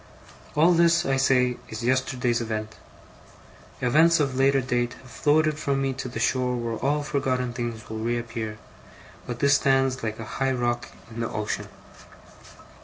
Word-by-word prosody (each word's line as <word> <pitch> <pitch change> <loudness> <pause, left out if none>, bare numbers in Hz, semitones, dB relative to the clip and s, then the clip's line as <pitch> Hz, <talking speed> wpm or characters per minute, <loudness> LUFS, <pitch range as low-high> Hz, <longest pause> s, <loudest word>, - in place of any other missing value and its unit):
All 165 +4 +5
this, 170 0 +4
I 135 0 +1
say, 125 -2 +3
is 110 +1 -6
yesterday's 125 -1 +1
event. 110 -1 -4 1.1
Events 160 +7 +4
of 135 -3 0
later 135 +1 +3
date 120 -1 -1
have 130 -2 -16
floated 155 +2 +2
from 140 -2 0
me 135 -1 0
to 125 -1 -5
the - - -5
shore 125 -1 +1
where 115 -1 -3
all 145 +2 0
forgotten 130 -4 -1
things 120 -2 -5
will 110 0 -5
reappear, 115 -1 -3 0.7
but 120 - -4
this 140 -1 +5
stands 135 -1 +2
like 110 -1 -3
a 115 - -7 0.2
high 135 0 +2
rock 120 -1 -1 0.2
in 115 - -8
the 115 - -1
ocean. 105 -1 -3
125 Hz, 160 wpm, -25 LUFS, 120-135 Hz, 1.1 s, All